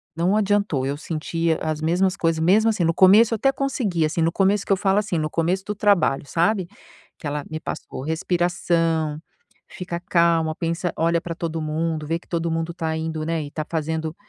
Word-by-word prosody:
não 175 Hz, +5 st, +1 dB
adiantou. 205 Hz, -9 st, +1 dB
Eu 140 Hz, +1 st, -2 dB
sentia 165 Hz, +1 st, -2 dB
as 155 Hz, -1 st, -2 dB
mesmas 180 Hz, +4 st, +1 dB
coisas 165 Hz, -1 st, 0 dB
mesmo 210 Hz, +6 st, +4 dB
assim, 215 Hz, -5 st, 0 dB
no 165 Hz, -, +2 dB
começo, 205 Hz, +6 st, +6 dB
eu -, -, 0 dB
até 270 Hz, +5 st, +3 dB
consegui 250 Hz, -, -1 dB
assim, 155 Hz, +2 st, -1 dB
no 165 Hz, +1 st, +2 dB
começo 195 Hz, +3 st, +1 dB
que -, -, -4 dB
eu -, -, +1 dB
falo 195 Hz, 0 st, +1 dB
assim, 200 Hz, -4 st, -2 dB
no 155 Hz, 0 st, -1 dB
começo 175 Hz, +4 st, 0 dB
do 210 Hz, -, -3 dB
trabalho, 200 Hz, -9 st, +2 dB
sabe, 175 Hz, +5 st, +1 dB, 0.5 s
que 155 Hz, -, -5 dB
ela 145 Hz, 0 st, -3 dB
me 155 Hz, -, -3 dB
passou 155 Hz, -, -6 dB
respiração, 165 Hz, -1 st, 0 dB, 0.5 s
"fica 175 Hz, -2 st, -6 dB
calma, 170 Hz, -2 st, +2 dB
pensa, 170 Hz, +2 st, -2 dB
olha 170 Hz, +1 st, +2 dB
para 170 Hz, -1 st, -5 dB
todo 165 Hz, -1 st, -3 dB
mundo, 155 Hz, 0 st, -2 dB
vê 165 Hz, +2 st, 0 dB
que -, -, -25 dB
todo 170 Hz, -1 st, -1 dB
mundo 165 Hz, +1 st, -2 dB
está 160 Hz, -1 st, -2 dB
indo, 160 Hz, -1 st, -3 dB
né, 165 Hz, -1 st, -1 dB
e -, -, -7 dB
está 155 Hz, +1 st, -4 dB
fazendo 160 Hz, 0 st, -2 dB
165 Hz, 200 wpm, -23 LUFS, 160-190 Hz, 0.5 s, começo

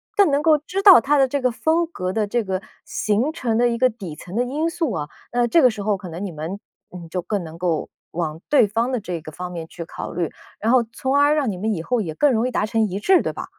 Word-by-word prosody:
更 400 Hz, -7 st, +5 dB
能 280 Hz, +1 st, +2 dB
够 310 Hz, 0 st, +5 dB
知 350 Hz, +7 st, -4 dB
道 390 Hz, -, +9 dB
他 285 Hz, +4 st, +2 dB
的 270 Hz, -, +5 dB
这 280 Hz, +2 st, -1 dB
个 255 Hz, -1 st, +2 dB
风 320 Hz, +8 st, +1 dB
格 185 Hz, -, -4 dB
的 215 Hz, +2 st, 0 dB
这 230 Hz, +3 st, -1 dB
个 190 Hz, -2 st, -2 dB, 0.3 s
形 220 Hz, +8 st, 0 dB
成 240 Hz, -7 st, -2 dB
的 245 Hz, 0 st, +4 dB
一 235 Hz, -, -1 dB
个 255 Hz, +2 st, +4 dB
底 195 Hz, -9 st, -8 dB
层 180 Hz, +4 st, -10 dB
的 240 Hz, -, +2 dB
因 290 Hz, +6 st, -1 dB
素 330 Hz, -4 st, -1 dB
啊， 150 Hz, -2 st, -4 dB, 0.2 s
那 240 Hz, 0 st, +2 dB
这 240 Hz, +8 st, +4 dB
个 255 Hz, -, +6 dB
时 215 Hz, -3 st, -5 dB
候 210 Hz, 0 st, +1 dB
可 190 Hz, -2 st, -8 dB
能 170 Hz, +5 st, -5 dB
你 190 Hz, -, -5 dB
们， 165 Hz, +5 st, -6 dB, 0.3 s
嗯， 175 Hz, -2 st, -9 dB
就 180 Hz, +2 st, -2 dB
更 195 Hz, +2 st, -2 dB
能 165 Hz, 0 st, -10 dB
够 170 Hz, -3 st, -1 dB, 0.2 s
往 160 Hz, -1 st, -4 dB
对 290 Hz, -6 st, +5 dB
方 230 Hz, +5 st, -1 dB
的 250 Hz, -, 0 dB
这 180 Hz, -5 st, -5 dB
个 155 Hz, -, -9 dB
方 180 Hz, +3 st, -6 dB
面 165 Hz, -2 st, -6 dB
去 170 Hz, 0 st, -8 dB
考 -, -, -7 dB
虑， 170 Hz, -1 st, -2 dB, 0.3 s
然 225 Hz, +4 st, +1 dB
后 255 Hz, -, +6 dB
从 265 Hz, +3 st, -1 dB
而 290 Hz, +1 st, +4 dB
让 280 Hz, -7 st, +1 dB
你 185 Hz, -, -6 dB
们 215 Hz, +4 st, -1 dB
以 165 Hz, -, -5 dB
后 245 Hz, +4 st, 0 dB
也 160 Hz, -6 st, -5 dB
更 290 Hz, -, +3 dB
容 230 Hz, +2 st, +1 dB
易 -, -, -3 dB
达 215 Hz, -, 0 dB
成 225 Hz, +1 st, 0 dB
一 195 Hz, 0 st, -4 dB
致， 370 Hz, -, +4 dB
对 -, -, -2 dB
吧？ -, -, -6 dB
220 Hz, 305 characters per minute, -22 LUFS, 180-265 Hz, 0.3 s, 道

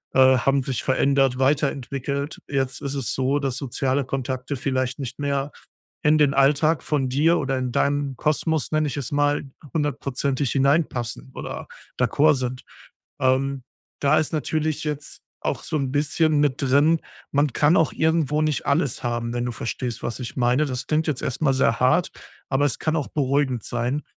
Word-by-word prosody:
äh, 130 Hz, -1 st, +6 dB
haben 135 Hz, +1 st, +2 dB
sich 130 Hz, -1 st, -3 dB
verändert, 135 Hz, -1 st, +2 dB
weiterentwickelt. 140 Hz, 0 st, -1 dB
Jetzt 135 Hz, -2 st, -1 dB
ist 140 Hz, 0 st, -3 dB
es 135 Hz, -6 st, -2 dB
so, 135 Hz, +2 st, +1 dB
dass 135 Hz, -3 st, -2 dB
soziale 135 Hz, 0 st, -1 dB
Kontakte 130 Hz, +1 st, -3 dB
vielleicht 130 Hz, -1 st, -1 dB
nicht 130 Hz, 0 st, -6 dB
mehr 140 Hz, 0 st, -1 dB, 0.5 s
in 150 Hz, +1 st, +5 dB
den 145 Hz, -2 st, +4 dB
Alltag 145 Hz, +3 st, +3 dB
von 140 Hz, -3 st, 0 dB
dir 160 Hz, +6 st, +3 dB
oder 135 Hz, 0 st, -1 dB
in 125 Hz, -1 st, -2 dB
deinen 140 Hz, 0 st, 0 dB
Kosmos, 155 Hz, +2 st, 0 dB
nenne 155 Hz, -1 st, +2 dB
ich 145 Hz, -, -4 dB
es 135 Hz, -3 st, -4 dB
mal, 145 Hz, 0 st, +1 dB, 0.3 s
hundertprozentig 140 Hz, -3 st, -1 dB
hinein 140 Hz, +4 st, +3 dB
passen 110 Hz, -, -5 dB
oder -, -, -6 dB, 0.3 s
d'accord 155 Hz, +1 st, +4 dB
sind. 125 Hz, -1 st, -4 dB, 0.6 s
Ähm, 130 Hz, +1 st, +1 dB, 0.4 s
da 145 Hz, +2 st, +4 dB
ist 155 Hz, -, -2 dB
natürlich 155 Hz, 0 st, -1 dB
jetzt 150 Hz, -1 st, -5 dB, 0.2 s
auch -, -, -2 dB
so 155 Hz, -, -2 dB
'n 135 Hz, -3 st, -2 dB
bisschen 150 Hz, +2 st, +2 dB
mit 145 Hz, -2 st, +1 dB
drin: 145 Hz, +4 st, +4 dB, 0.3 s
man 145 Hz, -2 st, +2 dB
kann 150 Hz, +6 st, +4 dB
auch 160 Hz, -6 st, +3 dB
irgendwo 155 Hz, -2 st, +1 dB
nicht 155 Hz, -2 st, -1 dB
alles 140 Hz, -3 st, +1 dB
haben, 120 Hz, -1 st, -2 dB
wenn 120 Hz, 0 st, -1 dB
du 125 Hz, -, -2 dB
verstehst, 120 Hz, +1 st, -4 dB
was 120 Hz, -, -3 dB
ich 125 Hz, -, -6 dB
meine. 125 Hz, +4 st, +2 dB
Das 130 Hz, -2 st, -4 dB
klingt 155 Hz, +1 st, +1 dB
jetzt 145 Hz, -5 st, -1 dB
erst 130 Hz, -, -3 dB
mal 140 Hz, -3 st, +3 dB
sehr 115 Hz, -4 st, +2 dB
hart, 130 Hz, +8 st, +3 dB, 0.4 s
aber 140 Hz, +2 st, +2 dB
es 130 Hz, -, 0 dB
kann 155 Hz, 0 st, 0 dB
auch 145 Hz, -, -2 dB
beruhigend 135 Hz, -4 st, 0 dB
sein, 125 Hz, +5 st, -2 dB
140 Hz, 175 wpm, -23 LUFS, 130-150 Hz, 0.6 s, äh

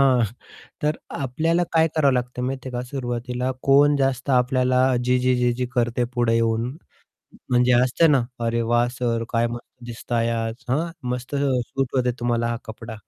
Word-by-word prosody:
हां, 130 Hz, -4 st, +4 dB, 0.6 s
तर 150 Hz, +1 st, +1 dB, 0.2 s
आपल्याला 160 Hz, +7 st, 0 dB
काय 160 Hz, 0 st, +4 dB
करावं 140 Hz, -3 st, +4 dB
लागतं, 125 Hz, 0 st, -2 dB
माहिती 130 Hz, +1 st, -3 dB
आहे -, -, -8 dB
का? 125 Hz, -, -2 dB
सुरवातीला 125 Hz, -1 st, -3 dB
कोण 145 Hz, +1 st, +5 dB
जास्त 135 Hz, 0 st, 0 dB
आपल्याला 130 Hz, 0 st, +3 dB, 0.2 s
जी-जी, 125 Hz, 0 st, +2 dB
जी-जी 125 Hz, 0 st, 0 dB
करते 120 Hz, 0 st, +1 dB
पुढे 120 Hz, -2 st, +2 dB
येऊन, 115 Hz, +1 st, +1 dB, 0.8 s
म्हणजे 125 Hz, 0 st, +4 dB
असते 125 Hz, +7 st, +4 dB
ना, 140 Hz, -4 st, +4 dB, 0.2 s
अरे 115 Hz, 0 st, 0 dB
वाह! 120 Hz, 0 st, +3 dB
सर 120 Hz, -2 st, -2 dB
काय 115 Hz, 0 st, +2 dB
मस्त 120 Hz, 0 st, -6 dB, 0.2 s
दिसताय 115 Hz, 0 st, -2 dB
आज, 115 Hz, -1 st, -2 dB
हां, 150 Hz, +7 st, +1 dB, 0.2 s
मस्त 125 Hz, +3 st, -4 dB
सूट 135 Hz, -1 st, -1 dB
होते 125 Hz, -1 st, +2 dB
तुम्हाला 120 Hz, -1 st, 0 dB
हा 120 Hz, -, -1 dB
कपडा. 110 Hz, 0 st, -8 dB
125 Hz, 160 wpm, -23 LUFS, 120-135 Hz, 0.8 s, कोण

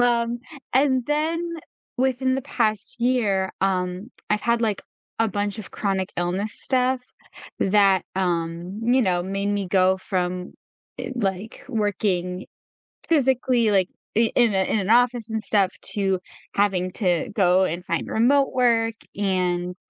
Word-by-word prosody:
Um, 235 Hz, -1 st, +2 dB, 0.4 s
and 260 Hz, -2 st, +3 dB
then 310 Hz, +3 st, 0 dB, 0.6 s
within 260 Hz, 0 st, +1 dB
the 265 Hz, -, -2 dB
past 225 Hz, -3 st, -2 dB
year, 210 Hz, -7 st, +1 dB
um, 185 Hz, +3 st, -1 dB, 0.2 s
I've 210 Hz, 0 st, +2 dB
had, 235 Hz, 0 st, +2 dB
like, 215 Hz, -4 st, 0 dB, 0.4 s
a 225 Hz, -1 st, +2 dB
bunch 205 Hz, +1 st, -2 dB
of 210 Hz, -, -8 dB
chronic 190 Hz, -2 st, -1 dB
illness 185 Hz, +4 st, -1 dB
stuff 255 Hz, -1 st, +1 dB, 0.6 s
that, 195 Hz, -2 st, +4 dB
um, 175 Hz, +1 st, -2 dB
you 250 Hz, +3 st, +3 dB
know, 180 Hz, -5 st, +1 dB
made 195 Hz, +2 st, -2 dB
me 205 Hz, -2 st, -1 dB
go 190 Hz, 0 st, +3 dB
from, 180 Hz, -1 st, -3 dB, 0.5 s
eh, -, -, -4 dB
like, 200 Hz, -1 st, -3 dB
working 195 Hz, -5 st, -1 dB, 0.6 s
physically, 255 Hz, -6 st, +2 dB
like, 190 Hz, -2 st, +3 dB, 0.3 s
i 230 Hz, -1 st, +3 dB
in 235 Hz, -5 st, +4 dB
a 190 Hz, -, +3 dB
in 220 Hz, -, +1 dB
an 195 Hz, 0 st, -3 dB
office 240 Hz, -1 st, +3 dB
and 220 Hz, -1 st, -2 dB
stuff 200 Hz, -2 st, +2 dB
to 195 Hz, -2 st, -1 dB, 0.4 s
having 190 Hz, -3 st, +1 dB
to 180 Hz, -4 st, 0 dB
go 185 Hz, -2 st, +4 dB
and 175 Hz, 0 st, -2 dB
find -, -, -2 dB
remote 270 Hz, +5 st, +3 dB
work, 230 Hz, -3 st, +2 dB, 0.2 s
and 180 Hz, -2 st, 0 dB
205 Hz, 140 wpm, -23 LUFS, 185-240 Hz, 0.6 s, that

